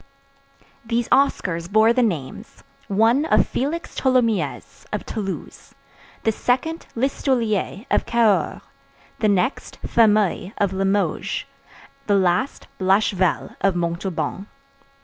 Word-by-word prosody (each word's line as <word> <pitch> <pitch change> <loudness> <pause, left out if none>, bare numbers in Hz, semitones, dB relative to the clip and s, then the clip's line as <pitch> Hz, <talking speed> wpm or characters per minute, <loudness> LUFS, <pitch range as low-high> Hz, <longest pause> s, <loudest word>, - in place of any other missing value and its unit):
These 230 0 -1
Oscars 185 -10 +1
bore 220 +2 +5
the 250 - +2
names, 165 - -3 0.2
one 225 +7 +3
of - - +4
Félix 300 +6 -3
Tholomyès, 250 -5 0
of - - -3
Toulouse; 195 -4 -6 0.5
the 225 - +3
second, 265 +9 -1
Listolier, 235 -4 -1
of - - +1
Cahors; 230 -4 +2 0.6
the 215 - +2
next, 205 +7 -1
Fameuil, 210 -3 +2
of 200 -2 +1
Limoges; 195 +1 -1 0.6
the 205 - +3
last, 190 +7 0
Blachevelle, 190 -1 +1
of 195 -2 +3
Montauban. 175 +3 -3
215 Hz, 105 wpm, -22 LUFS, 190-240 Hz, 0.6 s, bore